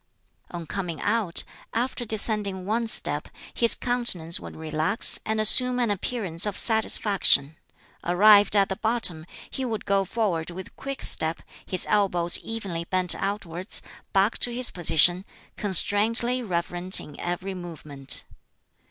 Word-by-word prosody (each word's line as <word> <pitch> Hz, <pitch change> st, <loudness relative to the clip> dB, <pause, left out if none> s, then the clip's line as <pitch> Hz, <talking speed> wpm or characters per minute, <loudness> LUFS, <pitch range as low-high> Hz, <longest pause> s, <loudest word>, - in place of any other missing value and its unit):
On 170 Hz, -2 st, -7 dB
coming 170 Hz, -2 st, -5 dB
out, 210 Hz, -5 st, +1 dB, 0.3 s
after 245 Hz, +1 st, -2 dB
descending 210 Hz, -3 st, -2 dB
one 225 Hz, +3 st, -1 dB
step 220 Hz, -, -1 dB, 0.3 s
his 235 Hz, -1 st, +3 dB
countenance 235 Hz, -10 st, -1 dB
would -, -, -10 dB
relax 155 Hz, +6 st, +2 dB
and 220 Hz, 0 st, -1 dB
assume 250 Hz, +4 st, +4 dB
an 235 Hz, -4 st, +1 dB
appearance 195 Hz, -3 st, -3 dB
of 205 Hz, -, -4 dB
satisfaction. 200 Hz, -, +2 dB, 0.5 s
Arrived 205 Hz, +4 st, +5 dB
at 200 Hz, -1 st, +3 dB
the 190 Hz, -, -2 dB
bottom, 215 Hz, -8 st, -2 dB, 0.2 s
he 265 Hz, -, -5 dB
would 225 Hz, -4 st, -4 dB
go 195 Hz, 0 st, +1 dB
forward 190 Hz, -5 st, -2 dB
with 185 Hz, +2 st, -10 dB
quick 275 Hz, 0 st, -6 dB
step, 160 Hz, +1 st, +2 dB, 0.2 s
his 185 Hz, -, 0 dB
elbows 180 Hz, -5 st, +2 dB
evenly 195 Hz, -7 st, -5 dB
bent 185 Hz, 0 st, +3 dB
outwards, 190 Hz, -2 st, -3 dB, 0.3 s
back 200 Hz, +2 st, +1 dB
to 245 Hz, -, 0 dB
his 245 Hz, +1 st, 0 dB
position, 175 Hz, +1 st, +4 dB, 0.3 s
constrainedly 220 Hz, +5 st, +2 dB
reverent 180 Hz, -2 st, -3 dB
in 150 Hz, -, -12 dB
every 175 Hz, +2 st, -4 dB
movement. 155 Hz, -6 st, -5 dB
195 Hz, 135 wpm, -25 LUFS, 175-220 Hz, 0.5 s, Arrived